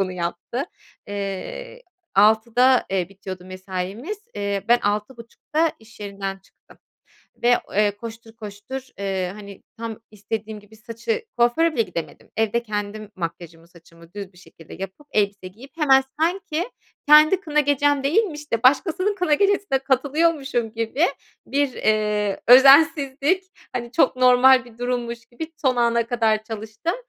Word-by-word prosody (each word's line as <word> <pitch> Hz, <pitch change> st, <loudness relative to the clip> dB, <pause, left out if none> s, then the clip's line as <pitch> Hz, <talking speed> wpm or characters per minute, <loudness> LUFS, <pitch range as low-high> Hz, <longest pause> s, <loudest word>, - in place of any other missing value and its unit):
bunu 185 Hz, -1 st, -1 dB
yaptı? 175 Hz, -, -4 dB, 0.4 s
Eee, 205 Hz, -, -6 dB, 0.3 s
18.00'da, 225 Hz, +5 st, +4 dB
eee, 185 Hz, -2 st, -1 dB
bitiyordu 190 Hz, -2 st, -9 dB
mesaimiz. 190 Hz, -, -6 dB, 0.2 s
Eee, 200 Hz, -1 st, -2 dB
ben 240 Hz, 0 st, +6 dB
18.30'da 235 Hz, +9 st, -2 dB
iş 220 Hz, 0 st, -19 dB
yerinden 195 Hz, -1 st, -5 dB
çıktım 190 Hz, -, -24 dB, 0.6 s
ve, 245 Hz, 0 st, +5 dB, 0.2 s
eee, 210 Hz, 0 st, +3 dB
koştur 225 Hz, 0 st, -10 dB
koştur, 215 Hz, +5 st, -8 dB
ııı, 190 Hz, -2 st, -2 dB
hani 200 Hz, -1 st, -11 dB
tam 225 Hz, -1 st, -6 dB
istediğim 215 Hz, +1 st, -6 dB
gibi 210 Hz, +2 st, -19 dB
saçı 230 Hz, -, -4 dB
kuaföre 275 Hz, +8 st, +3 dB
bile 230 Hz, -, +2 dB
gidemedim. 165 Hz, -6 st, -7 dB
Evde 225 Hz, +2 st, +1 dB
kendim 210 Hz, -1 st, -5 dB
makyajımı, 165 Hz, -1 st, -7 dB
saçımı 170 Hz, 0 st, -19 dB
düz 200 Hz, -2 st, -7 dB
bir 180 Hz, -, -20 dB
şekilde 165 Hz, -2 st, -14 dB
yapıp 195 Hz, -, -8 dB
elbise 200 Hz, -3 st, 0 dB
giyip 235 Hz, +9 st, -15 dB
hemen 270 Hz, -4 st, +5 dB, 0.2 s
sanki 350 Hz, +3 st, -1 dB, 0.4 s
kendi 310 Hz, +5 st, +7 dB
kına 300 Hz, -4 st, +1 dB
gecem 290 Hz, 0 st, +2 dB
değilmiş 300 Hz, -, 0 dB
de 230 Hz, +1 st, 0 dB
başkasının 355 Hz, +9 st, +3 dB
kına 360 Hz, -6 st, +1 dB
gecesine 400 Hz, -5 st, +2 dB
katılıyormuşum 270 Hz, -2 st, 0 dB
gibi 230 Hz, +9 st, 0 dB, 0.4 s
bir, 280 Hz, -1 st, 0 dB
eee, 210 Hz, -2 st, 0 dB
özensizlik, 280 Hz, +5 st, +6 dB, 0.3 s
hani, 240 Hz, -1 st, -5 dB
çok 320 Hz, -, +3 dB
normal 255 Hz, 0 st, +6 dB
bir 235 Hz, -1 st, -17 dB
durummuş 240 Hz, -1 st, -3 dB
gibi 320 Hz, +7 st, -8 dB
son 260 Hz, -4 st, +1 dB
ana 235 Hz, -1 st, +2 dB
kadar 225 Hz, -3 st, +1 dB
çalıştım 220 Hz, -, -4 dB
230 Hz, 135 wpm, -22 LUFS, 205-280 Hz, 0.6 s, kendi